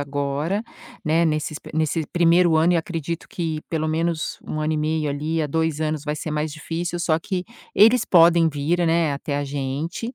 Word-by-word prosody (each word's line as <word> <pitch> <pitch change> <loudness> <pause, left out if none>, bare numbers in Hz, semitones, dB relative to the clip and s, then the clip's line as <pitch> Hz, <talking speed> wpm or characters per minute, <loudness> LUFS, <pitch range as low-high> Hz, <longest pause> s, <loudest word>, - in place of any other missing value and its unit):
agora, 145 +7 -2 0.4
né, 165 +2 +3
nesses 155 -1 -1
p - - -12
nesse 155 0 0
1.º 170 -1 +4
ano, 165 +3 +4
e - - +3
acredito 165 0 -4
que 160 -3 -3
pelo 155 -1 -1
menos 165 0 -1
1 155 - -3
ano 155 +1 0
e - - -1
meio, 155 0 0
ali, 155 +3 -1
a - - 0
2 160 0 -1
anos 155 -1 -2
vai 150 0 -1
ser 155 +1 -5
mais 150 0 -2
difícil. 165 +3 -4
Só 165 -2 +2
que 180 +1 -3 0.3
eles 225 +4 +6
podem 170 -1 +5
vir, 160 +4 0
né, 165 -2 +2
até 140 +1 -3
a 145 - -1
gente, 145 - -4
160 Hz, 195 wpm, -23 LUFS, 150-170 Hz, 0.4 s, eles